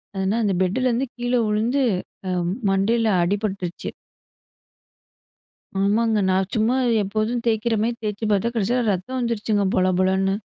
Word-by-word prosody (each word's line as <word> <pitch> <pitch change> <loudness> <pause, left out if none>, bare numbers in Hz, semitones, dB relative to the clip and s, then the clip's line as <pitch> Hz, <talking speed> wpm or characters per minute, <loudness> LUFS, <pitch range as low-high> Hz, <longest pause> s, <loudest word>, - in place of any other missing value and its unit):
அது 190 - -2
என்னா 210 +4 +1
அந்த 195 -2 +1
பெட்டுலருந்து 245 +7 +1
கீழே 245 0 0
உழுந்து 230 +6 +1 0.5
அ - - -1 0.4
மண்டையில 220 +4 +2
அடிபட்டுருச்சு. 195 -1 -2 1.9
ஆமாங்க. 220 +2 +2
நான் 190 0 +1
சும்மா 225 +4 +2 0.3
எப்போதும் 215 +4 -1
தேய்க்கிறமாரி 225 +1 +1
தேச்சுப் 210 +1 -2
பாத்தா, 205 +4 +2
கடைசில 235 +3 +1
ரத்தம் 195 +8 -4
வந்துருச்சுங்க. 220 -3 0
பொல 185 0 +3
பொலன்னு. 190 +1 +2
215 Hz, 120 wpm, -22 LUFS, 195-235 Hz, 1.9 s, பொல